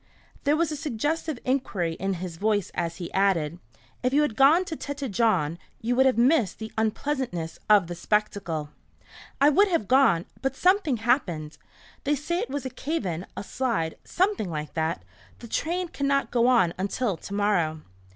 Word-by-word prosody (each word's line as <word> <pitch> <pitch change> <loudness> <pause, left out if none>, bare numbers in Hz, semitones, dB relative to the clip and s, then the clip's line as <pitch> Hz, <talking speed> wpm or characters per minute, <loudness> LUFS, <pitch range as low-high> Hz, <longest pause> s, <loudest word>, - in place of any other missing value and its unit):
There 290 +1 +4
was 325 -1 +1
a - - -2
suggestive 300 +2 -2
inquiry 215 -10 0
in 195 +3 -2
his 175 -1 -6
voice 205 -1 0
as 170 -1 -2
he 175 -2 -7
added, 175 -5 +1 0.4
"If 255 +1 0
you 295 +1 +4
had 250 -7 -1
gone 300 +9 +5
to 325 - -4
Tête 280 -4 -5
Jaune 185 -8 +1 0.2
you 240 +2 -1
would 265 +1 +5
have 260 - +2
missed 240 - +3
the 220 0 -7
unpleasantness 220 - -2
of 205 -3 +6
the 175 - -5
spectacle." 175 -5 -1 0.7
"I 285 - +6
would 405 +8 +5
have 335 - 0
gone, 255 -10 +4 0.2
but 270 0 -1
something 360 - +3
happened. 180 - 0 0.4
They 295 0 +2
say 340 +5 -2
it - - -3
was 280 -1 -4
a 260 - -4
cave 290 0 -3
in, 175 0 -3
a - - -3
slide 220 -9 -1
something 375 - 0
like 150 -2 -5
that. 160 +2 -2 0.3
The 235 - -10
train 350 +9 -1
cannot 275 -1 0
go 240 0 +3
on 230 -10 +4
until 200 +2 -1
to 200 - -9
morrow." 175 -7 +1
230 Hz, 180 wpm, -26 LUFS, 175-280 Hz, 0.7 s, of